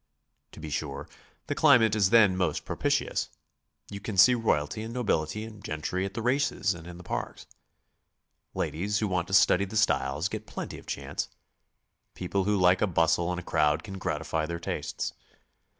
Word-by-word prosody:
To - - -11
be 75 -1 -7
sure, 70 -1 -4 0.4
the - - -2
climate 120 -8 +5
is 100 -3 +3
then 105 -5 +6
most 90 -1 -1
propitious; - - -1 0.6
you 100 - -5
can 100 0 -5
see 125 +7 +8
royalty 110 -6 0
and 110 +1 -6
nobility 105 -5 -1
and 110 -2 -10
gentry 90 +4 -2
at 95 - -6
the 115 - -3
races 125 -6 +1
and 85 -1 -11
in 90 -1 -9
the 90 - -11
parks; - - -5 1.1
ladies 100 +6 -1
who 105 - 0
want 90 -2 -1
to 95 - -7
study 100 -1 +5
the 105 +3 -4
styles 75 -6 +1
get 110 +1 -6
plenty - - -6
of - - -17
chance; - - -4 0.9
people 95 +1 -1
who 105 0 +2
like 90 0 +4
a 105 - +3
bustle 85 -1 +2
and 90 0 -2
a - - -8
crowd 75 0 +1
can 95 -2 -7
gratify 80 -3 -2
their 85 0 -4
tastes. - - -4
95 Hz, 180 wpm, -28 LUFS, 85-105 Hz, 1.1 s, see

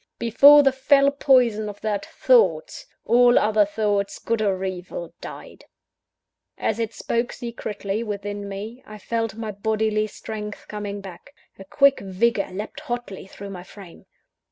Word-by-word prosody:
Before 280 +6 +7
the 270 - +4
fell 275 +1 +3
poison 245 -7 +3
of 205 0 -10
that 210 -2 -2
Thought, - - +2 0.2
all 245 +1 +5
other 210 -1 +3
thoughts 205 -1 -1
good 230 -1 -2
or 195 -2 0
evil 180 -2 -6
died. - - -10 0.9
As 220 - -1
it 225 -1 -2
spoke 235 +1 -2
secretly 215 -3 -5
within 205 -2 -5
me, 215 +6 -7
I 215 - -10
felt 225 0 -3
my 220 -1 -5
bodily 215 +1 0
strength 210 0 -8
coming 205 -1 -5
back; 195 +9 -12 0.2
a 195 - -10
quick 275 +6 +3
vigour 200 +2 0
leapt 205 +4 -6
hotly 240 -6 -6
through 200 +1 -9
my 180 -2 -7
frame. 185 -1 -14
215 Hz, 145 wpm, -23 LUFS, 200-235 Hz, 0.9 s, Before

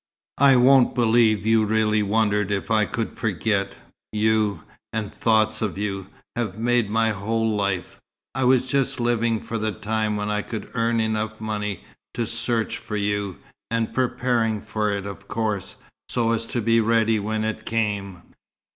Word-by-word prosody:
"I 140 -1 +7
won't 130 +1 +5
believe 110 -4 +3
you 110 0 +4
really 110 0 +2
wondered 105 -1 +1
if 100 +2 -2
I 110 -1 +4
could 115 +2 -3
forget. 105 -2 -1 0.4
You, 110 -1 +1 0.3
and 110 -2 -3
thoughts 110 -1 +2
of 100 -5 -2
you, 95 -2 -3 0.3
have 120 -3 -2
made 120 -1 +1
my 115 +1 +2
whole 110 +2 -1
life. 100 -3 -2 0.3
I 130 +1 0
was 130 0 +4
just 135 0 0
living 120 -1 +1
for 115 - -4
the 110 0 -1
time 110 +1 -1
when 105 0 -2
I 105 0 0
could 110 +1 -7
earn 115 -1 +1
money 110 - +2 0.7
enough 95 - -9 0.3
to 115 - 0
search 115 0 -1
for 105 - -6
you 100 -2 -1 0.3
and 115 -1 -1
preparing 120 -3 +1
for 105 0 -2
it, 100 -1 -3
of 100 0 -8
course, 110 -4 -2 0.3
so 115 -1 +1
as 115 0 -1
to 120 -1 -2
be 115 +1 +3
ready 110 0 +2
when 110 +1 -2
it 110 0 -3
came." 100 -6 -2
110 Hz, 165 wpm, -23 LUFS, 105-115 Hz, 0.7 s, I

